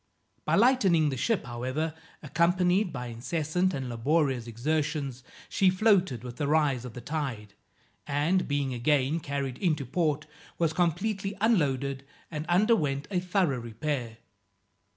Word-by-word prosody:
By -, -, +2 dB
lightening 195 Hz, -, +4 dB
the 135 Hz, -, -2 dB
ship, 220 Hz, -, 0 dB
however, 130 Hz, +6 st, -3 dB, 0.3 s
accompanied 180 Hz, +5 st, +2 dB
by 125 Hz, -3 st, -5 dB
incessant 155 Hz, +9 st, -1 dB
and 135 Hz, -2 st, -4 dB
laborious 130 Hz, +1 st, 0 dB
exertions, 145 Hz, +2 st, -2 dB, 0.3 s
she 190 Hz, -, +3 dB
floated 185 Hz, -, +2 dB
with 125 Hz, -1 st, -8 dB
the 145 Hz, -, -1 dB
rise 145 Hz, -5 st, +2 dB
of 125 Hz, -, -8 dB
the 125 Hz, -, -7 dB
tide, 125 Hz, -8 st, -4 dB, 0.5 s
and, 150 Hz, +6 st, +1 dB
being 140 Hz, -2 st, -1 dB
again 140 Hz, +4 st, +1 dB
carried 140 Hz, -4 st, -4 dB
into 155 Hz, -7 st, 0 dB
port, 150 Hz, +2 st, 0 dB, 0.3 s
was 165 Hz, -2 st, +1 dB
completely 190 Hz, +4 st, -1 dB
unloaded, 140 Hz, -, +1 dB, 0.3 s
and 155 Hz, 0 st, -4 dB
underwent 175 Hz, -7 st, +2 dB
a 185 Hz, -, +1 dB
thorough 180 Hz, -7 st, +1 dB
repair. 120 Hz, 0 st, -4 dB
150 Hz, 130 wpm, -28 LUFS, 130-175 Hz, 0.5 s, lightening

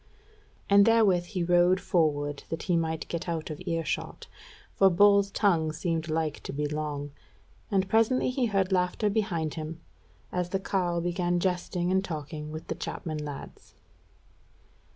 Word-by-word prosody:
And 200 Hz, 0 st, +7 dB
therewith 205 Hz, -6 st, +4 dB
he 180 Hz, -1 st, -3 dB
rode 175 Hz, +2 st, +4 dB
forward 145 Hz, -5 st, 0 dB
that 165 Hz, -, -4 dB
he 175 Hz, -, +1 dB
might 160 Hz, -1 st, -1 dB
get 170 Hz, +1 st, -4 dB
out 165 Hz, -1 st, -3 dB
of 150 Hz, -, -7 dB
earshot, 165 Hz, -1 st, -3 dB, 0.5 s
for 195 Hz, -, +5 dB
Bull's 200 Hz, +2 st, +5 dB
tongue 170 Hz, -6 st, +2 dB
seemed 165 Hz, 0 st, -2 dB
like 155 Hz, -1 st, -1 dB
to -, -, -6 dB
be 150 Hz, +1 st, -2 dB
long. 145 Hz, -1 st, -3 dB, 0.6 s
And 190 Hz, -1 st, +1 dB
presently 225 Hz, +5 st, +2 dB
he 255 Hz, -1 st, 0 dB
heard 195 Hz, -2 st, 0 dB
laughter 185 Hz, +3 st, +1 dB
behind 180 Hz, -8 st, -1 dB
him, 160 Hz, 0 st, -6 dB, 0.5 s
as 180 Hz, -1 st, -2 dB
the 195 Hz, -, -1 dB
carle 180 Hz, -3 st, -1 dB
began 175 Hz, 0 st, 0 dB
jesting 180 Hz, 0 st, -1 dB
and 190 Hz, 0 st, +2 dB
talking 150 Hz, -3 st, -6 dB
with 155 Hz, +1 st, -7 dB
the -, -, -3 dB
chapman 155 Hz, -2 st, -5 dB
lads. 145 Hz, -2 st, -9 dB
175 Hz, 155 wpm, -28 LUFS, 155-190 Hz, 0.6 s, And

